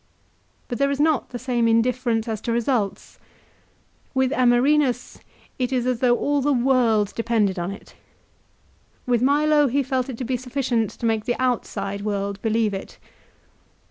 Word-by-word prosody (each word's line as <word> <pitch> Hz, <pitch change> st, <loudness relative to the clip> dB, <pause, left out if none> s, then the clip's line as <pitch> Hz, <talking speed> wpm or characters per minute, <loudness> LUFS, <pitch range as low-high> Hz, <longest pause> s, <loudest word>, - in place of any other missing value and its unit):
But 245 Hz, -, -5 dB
there 280 Hz, 0 st, +2 dB
is 280 Hz, 0 st, -2 dB
not 305 Hz, -2 st, +1 dB
the 245 Hz, -, -5 dB
same 240 Hz, -2 st, 0 dB
indifference 230 Hz, 0 st, +1 dB
as 220 Hz, -2 st, -3 dB
to 235 Hz, -, -3 dB
results. 230 Hz, -4 st, -2 dB, 1.0 s
With 260 Hz, 0 st, +2 dB
Amerinus 255 Hz, 0 st, +2 dB, 0.4 s
it 250 Hz, 0 st, -1 dB
is 250 Hz, -2 st, 0 dB
as 250 Hz, -2 st, 0 dB
though 245 Hz, -1 st, +3 dB
all 285 Hz, 0 st, 0 dB
the 290 Hz, +2 st, +1 dB
world 240 Hz, -5 st, +2 dB
depended 220 Hz, -5 st, 0 dB
on 175 Hz, +1 st, -2 dB
it. 200 Hz, -, -10 dB, 1.1 s
With 245 Hz, -2 st, +1 dB
Milo 295 Hz, +2 st, +3 dB
he 275 Hz, +3 st, +1 dB
felt 260 Hz, 0 st, -2 dB
it 250 Hz, -, -6 dB
to 255 Hz, -, -4 dB
be 250 Hz, +1 st, -1 dB
sufficient 245 Hz, -3 st, -1 dB
to -, -, -7 dB
make 220 Hz, -1 st, 0 dB
the 240 Hz, -1 st, -2 dB
outside 200 Hz, -6 st, -2 dB
world 200 Hz, -1 st, -3 dB
believe 220 Hz, -2 st, +1 dB
it. 195 Hz, -, -7 dB
245 Hz, 160 wpm, -23 LUFS, 225-260 Hz, 1.1 s, though